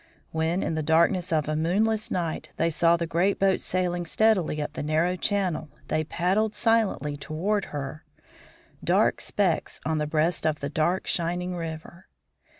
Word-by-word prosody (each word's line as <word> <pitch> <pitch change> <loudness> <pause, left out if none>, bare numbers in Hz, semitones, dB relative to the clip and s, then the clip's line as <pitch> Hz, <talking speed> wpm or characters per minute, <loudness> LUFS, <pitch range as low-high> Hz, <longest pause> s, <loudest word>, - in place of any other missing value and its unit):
When, 160 +3 0
in - - -1
the 160 - -1
darkness 170 +4 +2
of 155 -3 +1
a 155 - -1
moonless 210 +7 +1
night, 170 -3 -3
they 165 0 +1
saw 170 +2 +3
the 170 - -2
great 175 +5 +1
boat 195 -1 +2
sailing 175 -1 -1
steadily 195 -7 +2
up 150 0 -3
the - - -4
narrow 160 +4 +1
channel 185 -6 -1 0.2
they 155 - +1
paddled 195 +7 0
silently 220 - +1
toward 180 +8 -1
her, 145 +1 -6 0.8
dark - - +2
specks - - 0
on 160 0 0
the 150 - -1
breast 160 +2 +1
of 155 -1 0
the 140 - -3
dark, 160 +5 0
shining 175 +1 -1
river. 165 +1 -7
170 Hz, 160 wpm, -26 LUFS, 155-185 Hz, 0.8 s, saw